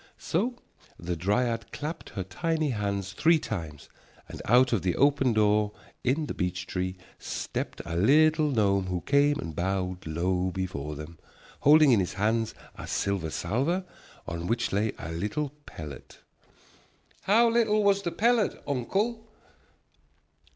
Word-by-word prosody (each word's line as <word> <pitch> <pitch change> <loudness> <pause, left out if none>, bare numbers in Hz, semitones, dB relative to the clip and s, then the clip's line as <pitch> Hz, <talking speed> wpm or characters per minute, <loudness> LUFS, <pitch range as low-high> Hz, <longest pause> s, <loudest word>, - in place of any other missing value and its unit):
So 230 +10 -1 0.4
the 85 +1 -3
dryad 115 +7 0
clapped 155 +4 -5
her 95 - -2
tiny 155 - -1
hands 100 -3 -2
three 160 +8 +4
times, 80 - -6 0.4
and - - -8
out 125 +2 +5
of 105 - +2
the 90 -2 0
open 140 -2 +3
door 105 -1 +2 0.3
into 140 +5 +1
the - - -4
beech 90 0 -2
tree 95 0 -3 0.2
stepped - - -4
a 85 -1 -4
little 155 - +4
gnome 100 -6 +2
who 90 -1 -2
came 145 - +3
and 80 -2 -5
bowed 90 0 -2
low 90 +3 0
before 85 -6 -4
them, 75 +2 -9 0.4
holding 150 0 +6
in 115 - +5
his 90 - -1
hands 110 +3 0 0.2
a - - -8
silver 100 -5 -1
salver 135 - -1 0.4
on 85 +1 -4
which 115 -2 0
lay 105 +2 +1
a 85 - -6
little 105 - -2 0.2
pellet. 75 -4 -9 1.1
"How 225 +4 +5
little 220 -2 +3
was 200 -1 +3
the 175 - -2
pellet, 230 +1 +2
uncle?" 205 - -1
105 Hz, 145 wpm, -28 LUFS, 90-150 Hz, 1.1 s, holding